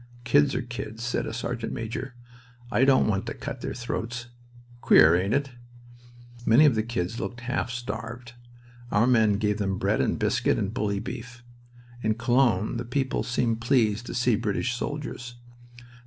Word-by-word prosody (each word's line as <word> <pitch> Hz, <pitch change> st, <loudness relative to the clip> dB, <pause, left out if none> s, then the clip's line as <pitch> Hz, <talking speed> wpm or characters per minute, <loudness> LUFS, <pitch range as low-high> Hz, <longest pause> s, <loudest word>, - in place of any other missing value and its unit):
"Kids 140 Hz, +3 st, +3 dB
are -, -, -1 dB
kids," 115 Hz, -2 st, -6 dB
said 120 Hz, -, -1 dB
a -, -, -4 dB
sergeant 115 Hz, 0 st, -4 dB
major. 120 Hz, +3 st, -5 dB, 0.6 s
"I 130 Hz, -, +4 dB
don't 135 Hz, -1 st, +5 dB
want 100 Hz, -2 st, -1 dB
to -, -, -4 dB
cut -, -, -6 dB
their -, -, -4 dB
throats! 120 Hz, -1 st, -4 dB, 0.5 s
Queer, 80 Hz, +1 st, +7 dB
ain't 95 Hz, +6 st, +1 dB
it?" 140 Hz, -1 st, -1 dB, 0.9 s
Many 120 Hz, +7 st, +6 dB
of 145 Hz, -, +5 dB
the 110 Hz, -, +1 dB
"kids" 115 Hz, -2 st, -3 dB
looked 125 Hz, +1 st, -5 dB
half 125 Hz, 0 st, -2 dB
starved. 120 Hz, +1 st, -6 dB, 0.6 s
Our 105 Hz, +3 st, +4 dB
men 110 Hz, -4 st, +4 dB
gave 105 Hz, 0 st, 0 dB
them 95 Hz, -2 st, -1 dB
bread -, -, +1 dB
and -, -, 0 dB
biscuit -, -, +1 dB
and 100 Hz, +1 st, -2 dB
bully 105 Hz, -5 st, -1 dB
beef. 125 Hz, +2 st, -8 dB, 0.6 s
In 110 Hz, -1 st, +1 dB
Cologne 120 Hz, -1 st, +2 dB
the 120 Hz, -, -3 dB
people 130 Hz, +2 st, -1 dB
seemed 115 Hz, -2 st, -1 dB
pleased 115 Hz, -2 st, +2 dB
to -, -, -5 dB
see 125 Hz, -2 st, +3 dB
British 105 Hz, +4 st, -1 dB
soldiers. 125 Hz, -2 st, -5 dB
120 Hz, 165 wpm, -26 LUFS, 110-125 Hz, 0.9 s, Queer